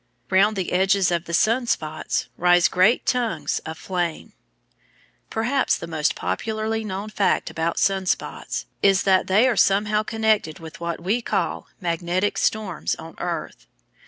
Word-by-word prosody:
Round 200 +3 +4
the 190 -3 -3
edges 190 0 +3
of 170 -1 -1
the 170 - -7
sun 235 +6 +2
spots 155 -8 -2
rise 175 0 +4
great 190 +6 +3
tongues 245 -3 0
of 160 0 -6
flame. 175 -3 -3 1.0
Perhaps 245 +5 +1
the - - -7
most 160 -1 0
popularly 220 0 -2
known 200 0 -5
fact 205 -2 0
about 165 +1 -2
sun 190 -1 +1
spots - - -2 0.2
is 195 -1 +4
that 190 -1 +3
they 210 +7 +4
are 250 - +2
somehow 210 +2 +3
connected 215 -7 0
with 160 -2 -11
what 170 0 -3
we 205 +8 0
call - - -2
magnetic 175 +2 -1
storms 210 -6 -1
on 165 0 -10
earth. - - -5
190 Hz, 150 wpm, -23 LUFS, 170-215 Hz, 1.0 s, Round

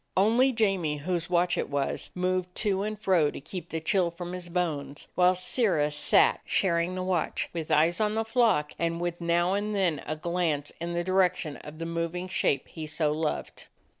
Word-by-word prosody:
Only 230 +7 +4
Jamie, 195 -10 +1
whose 165 +3 -3
watch 175 0 +2
it - - -2
was, 140 -1 -2
moved 185 0 -1
to 195 -3 0
and 215 0 -3
fro 180 -8 +3
to - - -7
keep 170 +4 -8
the 160 - -3
chill 175 +2 +2
from 175 +1 -7
his 180 -1 -5
bones, 150 -5 -2
while 180 0 +4
Sirrah 180 - +1
sat, 150 - +4
sharing 175 -1 +1
the 185 - -3
Nvatch, 180 -4 -1
with 165 -2 -4
eyes 160 +5 +3
on 210 0 +1
the 225 0 0
flock, 225 -11 +2
and 170 0 -1
with 175 0 -3
now 170 +2 +2
and 205 +1 -1
then 175 -7 +1
a 155 - -2
glance 165 -3 -1
in 170 0 -3
the 175 0 -1
direction 180 -4 +1
of 150 +1 -11
the 165 - -4
moving 170 +2 -3
shape 180 -7 0
he 160 -2 -7
so 155 -1 0
loved. 155 0 -3
175 Hz, 195 wpm, -28 LUFS, 160-185 Hz, -, Only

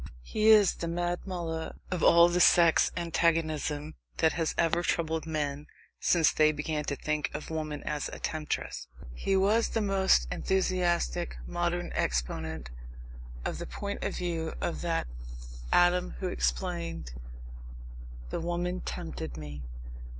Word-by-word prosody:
He 215 - 0
is 210 -3 +7
the 170 - -5
Mad 175 +1 -1
Mullah 165 -3 -4 0.2
of 180 -2 -1
all 170 0 +7
the 175 +1 +1
sex 170 -2 +6
antagonism 160 -3 0 0.2
that 160 -1 +3
has 165 -2 -1
ever 170 0 +2
troubled 160 -2 -1
men 150 -2 -2 0.3
since 165 -3 +4
they 155 0 +4
began 150 0 -2
to 140 - -1
think 150 +1 -1
of 150 - -6
woman 155 -2 -3
as 150 -1 -2
a - - -7
temptress. 155 - -3 0.3
He 195 - 0
was 205 +4 +3
the 225 - -1
most 190 - +3
enthusiastic 175 - 0
modern 175 0 -2
exponent 65 +2 -2 0.7
of - - -3
the - - -5
point - - -5
of - - -2
view 165 -2 -2
of 170 - -2
that 170 -1 0 0.7
Adam 175 - +3
who - - -2
explained: - - -2 1.2
"The - - -2
woman 175 +2 -2
tempted 65 -5 -5
me." 75 -2 -7
160 Hz, 135 wpm, -29 LUFS, 145-175 Hz, 1.2 s, is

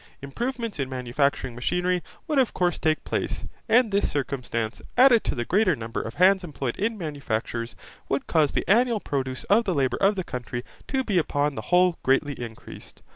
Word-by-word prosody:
Improvements 230 - -4
in 135 -1 -1
manufacturing 130 +1 -1
machinery 180 +9 0 0.3
would 300 -4 +2
of 255 - +1
course 175 -2 +1
take 155 -1 +1
place, - - -3 0.2
and 230 -1 +4
this 200 +1 +2
circumstance, 125 -5 -3 0.2
added 250 -3 +7
to - - -2
the 120 - -2
greater 185 - +3
number 115 -2 -4
of 115 - -7
hands 190 +1 +5
employed 140 -7 -4
in 220 +3 -1
manufactures, 120 - -3 0.3
would 135 - -1
cause 155 -4 +2
the - - -1
annual 235 +2 +3
produce 130 -6 -3
of 225 +3 +3
the 185 -4 0
labour 135 -2 +1
of 200 +2 +4
the 185 - -2
country 125 -3 -5 0.2
to 265 -1 0
be 200 -7 +2
upon 145 -2 0
the - - -5
whole 180 -1 +4
greatly 135 +2 +2
increased. 120 -4 -10
155 Hz, 180 wpm, -25 LUFS, 130-200 Hz, 0.3 s, added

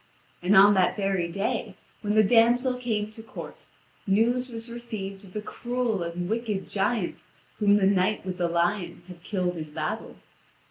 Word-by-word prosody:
And 185 +3 +3
on 200 +2 +8
that 185 -2 +3
very 195 -4 0
day, 200 +3 -2 0.3
when 210 0 -1
the 215 - +6
damsel 240 +4 +4
came 220 -4 -2
to 225 - -10
court, 225 - -10 0.4
news 240 +6 +2
was 230 0 -7
received 215 -5 -6
of 185 - -15
the 210 - -4
cruel 240 -3 -2
and 170 +1 -3
wicked 215 -2 -2
giant 205 -1 -1 0.4
whom 205 -1 +5
the 200 - +2
knight 195 +1 +2
with 185 -1 -4
the 175 -1 +1
lion 175 +1 -1
had 180 -2 -11
killed 180 -2 -2
in 155 -2 -6
battle. - - -3
205 Hz, 170 wpm, -26 LUFS, 185-225 Hz, 0.4 s, on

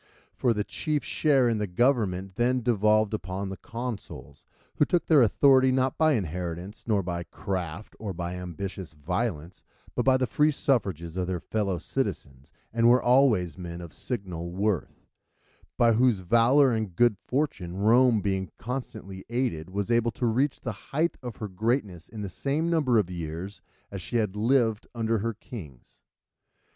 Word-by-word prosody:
For 125 - +1
the 105 -2 0
chief 150 +6 -2
share 140 -5 +3
in 115 -2 +1
the 105 - -1
government 95 -3 +1
then 125 +4 +1
devolved 110 -2 +3
upon 95 0 -3
the 95 - -6
consuls, 115 -2 -7 0.3
who - - +5
took 175 +3 +1
their 155 -4 +6
authority 130 +3 +5
not 130 0 0
by 155 -1 +5
inheritance, 90 - -4
nor 105 -3 +2
yet - - -11
by 85 -1 -2
craft 95 0 -5
or 105 -3 -4
by 85 0 -4
ambitious 90 0 -6
violence, 85 +2 -3 0.3
but - - 0
by 130 0 +4
the 130 - +1
free 150 +4 +2
suffrages 95 - 0
of 90 -1 -1
their 90 -1 -2
fellow 100 -1 -1
citizens, 70 -2 -4 0.2
and 115 0 +4
were 125 +1 +6
always 120 - +3
men 85 -1 -6
of 85 -2 -9
signal 90 -8 -5
worth; 95 +1 -2 0.7
by 115 -1 +5
whose 115 -3 +3
valour 120 +8 +4
and 110 -6 -2
good 120 +2 +4
fortune 125 - -2
Rome 115 +2 +4
being 95 -2 -1
constantly 110 -6 -6
aided, 120 -10 -2
was 100 +4 -2
able 115 0 +3
to 125 - -2
reach 130 +5 +1
the 120 - -3 0.2
height 160 +4 +1
of 125 -3 -6
her 105 - -5
greatness 100 - -2
in 110 -2 -7
the - - -3
same 145 - -1
number 145 -8 +3
of 95 -4 +1
years 85 +3 -6 0.3
as 100 -2 -5
she 120 - -5
had 105 -4 +1
lived 115 0 +2
under 115 -1 0
her 115 +2 -2
kings. 85 - -11
110 Hz, 170 wpm, -27 LUFS, 90-125 Hz, 0.7 s, their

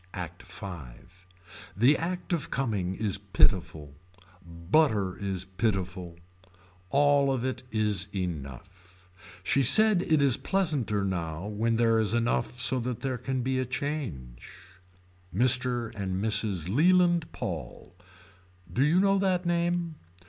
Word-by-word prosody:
ACT 90 -1 -7
V. 110 - -7 1.1
The 125 +8 +5
act 180 +3 -4
of 165 -5 -2
coming 105 -8 -2
is 105 -2 -3
pitiful. 90 -6 0 0.5
Butter 95 - 0
is 95 -3 -4
pitiful. 95 -3 -3 0.7
All 140 +2 +3
of 130 -2 -2
it 130 -1 -3
is 105 -4 -1
enough. 90 +2 -7 0.4
She 140 - +2
said 215 - +6
it 160 -4 +1
is 135 -2 +3
pleasanter 145 - -1
now 85 -2 -4
when 110 +2 -1
there 115 -1 +2
is 110 +1 0
enough 120 +1 -1
so 125 +1 +1
that 120 0 -4
there 130 -3 -3
can 130 0 -3
be 130 +1 -1
a - - 0
change. 125 - -5 0.8
Mr. 125 +2 +3
and 95 -3 -3
Mrs. 100 -4 0
Leland 175 - +3
Paul. 85 +1 -7 0.8
Do 130 - +2
you 160 +5 +3
know 195 0 +3
that 185 -2 0
name. 170 -1 -1
115 Hz, 125 wpm, -27 LUFS, 95-140 Hz, 1.1 s, said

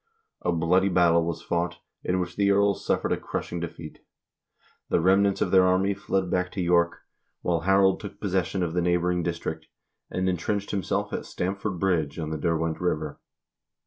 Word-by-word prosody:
A - - 0
bloody 90 +4 +2
battle 85 -2 +4
was 85 0 -4
fought, 85 0 -1 0.3
in 90 +1 0
which 90 -1 -3
the 100 -1 +2
earls 100 0 +2
suffered - - 0
a - - +2
crushing 85 - -4
defeat. 85 -2 -7 0.9
The - - +3
remnants 95 +3 +3
of - - +1
their 95 -1 +6
army 95 +2 +2
fled 95 -2 -2
back 90 0 0
to - - -5
York, 85 -1 +2 0.4
while 85 -1 +1
Harald 95 +2 +3
took 100 -1 -9
possession 95 -2 0
of 85 -2 -2
the 90 - +1
neighboring 90 0 +1
district, 85 0 -4 0.4
and 95 0 -1
intrenched 100 +3 -1
himself 95 -5 -1
at - - -4
Stamford 95 +1 -3
Bridge 85 -6 0
on 80 -2 -4
the 80 - -2
Derwent 80 -1 -1
River. 75 -4 -2
90 Hz, 175 wpm, -26 LUFS, 85-95 Hz, 0.9 s, their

